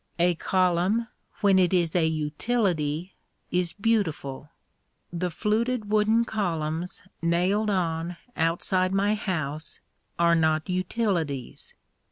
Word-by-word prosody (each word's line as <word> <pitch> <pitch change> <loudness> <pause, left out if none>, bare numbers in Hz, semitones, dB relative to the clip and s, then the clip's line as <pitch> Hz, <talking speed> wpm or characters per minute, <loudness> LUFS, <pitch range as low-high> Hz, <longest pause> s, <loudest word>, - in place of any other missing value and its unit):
A 175 +1 +3
column, 185 +6 +1 0.3
when 195 -2 +5
it 185 0 +3
is 170 -2 +1
a 165 -3 +4
utility, 160 +1 -1 0.4
is 180 -1 +1
beautiful. 165 - -1 0.6
The 180 +1 -1
fluted 215 +4 -1
wooden 215 +2 +3
columns 170 -5 -2 0.2
nailed 180 +6 +2
on 170 -2 -1 0.2
outside 185 +3 +1
my 200 +2 +3
house 155 -7 -3 0.4
are 170 0 +4
not 160 -1 +2
utilities. 180 - -2
180 Hz, 105 wpm, -26 LUFS, 160-205 Hz, 0.6 s, when